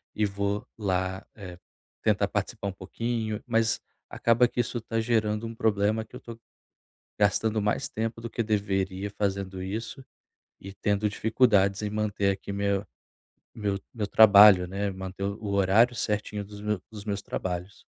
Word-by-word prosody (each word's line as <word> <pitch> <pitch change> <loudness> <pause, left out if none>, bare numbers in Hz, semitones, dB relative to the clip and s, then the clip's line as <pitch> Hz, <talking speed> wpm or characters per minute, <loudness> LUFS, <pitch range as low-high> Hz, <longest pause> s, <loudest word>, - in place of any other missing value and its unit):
e 105 - +2
vou 100 +1 -2
lá, 95 -2 -1
eh, 90 -4 -9 0.4
tentar - - +2
participar 100 - -3
um - - -3
pouquinho, 110 +3 -3
mas 115 -1 +1 0.3
acaba 115 +1 +3
que 120 - -6
isso 120 0 -4
tá 115 0 -2
gerando 110 -1 0
um 115 - -5
problema 110 0 +1
que 115 - -15
eu - - -9
tô 115 -1 -10 0.8
gastando 105 +2 +2
mais 105 0 -1
tempo 115 +1 -3
do 115 - -5
que 115 - -2
deveria 100 -2 -1
fazendo 95 -2 -2
isso 110 +7 -5 0.6
e 95 0 -9
tendo 105 +1 0
dificuldades 105 -2 +2
em 105 - -2
manter 105 -2 0
aqui 100 +1 -5
me 100 0 -3 0.9
meu 100 -2 -2
meu 105 -3 -2
trabalho, 100 -3 +8
né, 100 +2 -2
manter 95 0 -7
o 100 +2 -4
horário 100 +5 +4
certinho 105 -1 -2
dos 105 0 -11
me 105 -1 -1
dos 105 -1 -10
meus 100 -1 -2
trabalhos. 90 +1 -5
105 Hz, 155 wpm, -27 LUFS, 100-110 Hz, 0.9 s, trabalho